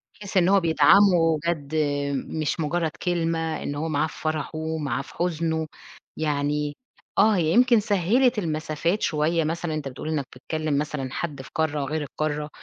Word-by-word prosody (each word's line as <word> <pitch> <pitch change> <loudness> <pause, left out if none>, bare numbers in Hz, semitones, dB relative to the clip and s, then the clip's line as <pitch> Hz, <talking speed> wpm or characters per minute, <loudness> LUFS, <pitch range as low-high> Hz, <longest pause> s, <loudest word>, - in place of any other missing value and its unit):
بحيث 200 -2 -4
إن 180 0 +4
هو 200 0 +5
بيدعمه 170 -1 +5
جَد 155 -3 -2 0.5
مش 155 +1 -2
مجرّد 160 +1 0
كلمة، 165 -2 -1
إن 145 - -3
هو 155 +3 -2
معاه 155 +1 +1
في - - -12
فرحُه، 155 0 -2
معاه 140 -5 -2
في 135 - -13
حزنُه، 160 -2 -1 0.5
يعني 150 -1 -1 0.4
آه، 210 +1 +5
هي 170 -3 +1
يمكن 245 0 +5
سهِّلِت 215 +5 +2
المسافات 160 +2 -1
شوية 160 +2 +1
مثلًا، 165 +1 -2
أنت 150 -3 -3
بتقول 135 +4 -6
إنك 150 -4 -1
بتكلم 155 +2 -2
مثلًا 145 -3 -2
حد 145 -3 -4
في - - -12
قارة 150 -2 0
غير 155 +3 -2
القارة، 150 +1 -3
160 Hz, 160 wpm, -25 LUFS, 150-170 Hz, 0.5 s, هو